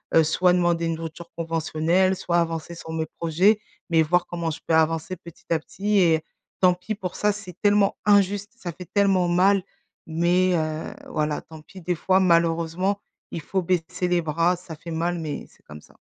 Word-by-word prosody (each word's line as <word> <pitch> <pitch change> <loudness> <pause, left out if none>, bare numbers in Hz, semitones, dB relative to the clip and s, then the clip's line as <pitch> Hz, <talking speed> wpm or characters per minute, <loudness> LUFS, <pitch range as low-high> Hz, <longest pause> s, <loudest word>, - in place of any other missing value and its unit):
heu, 165 - +7
soit 180 +3 +3
demander 175 -1 +2
une 165 - -1
rupture 165 +1 -8
conventionnelle 165 +3 +1
soit 175 -2 -1
avancer 165 0 -2
sur 160 -1 -8
mes 160 0 -2
projets». 180 +6 +3 0.3
Mais 165 -1 +4
voir 175 +3 +2
comment 170 -2 -3
je 155 - -6
peux - - +1
avancer 160 +2 +1
petit 170 -1 -14
à 165 - +3
petit 205 +6 -1
et 165 -3 +3 0.4
tant 180 -1 +6
pis 200 +5 -5
pour 185 -3 -5
ça, 210 0 +2
c'est 200 -4 -9
tellement 205 -1 +3
injuste, 205 0 +3
ça 175 -6 -5
fait 180 +2 -10
tellement 195 -3 +3
mal. 190 +2 +3 0.4
Mais, 175 +3 +2
heu, 155 -1 -2 0.2
voilà 150 -1 -1
tant 160 -1 -13
pis 190 +5 -13
des 180 +2 -1
fois, 185 +3 +2
malheureusement, 170 +2 +2 0.3
il 165 - -4
faut 190 +5 -1
baisser 180 0 -1
les 175 -1 +2
bras, 165 +3 +1
ça 170 -2 -10
fait 165 +2 -9
mal 170 +2 -1
mais 155 -3 -5
c'est - - -26
comme 75 0 -11
ça. - - -22
170 Hz, 195 wpm, -24 LUFS, 160-185 Hz, 0.4 s, heu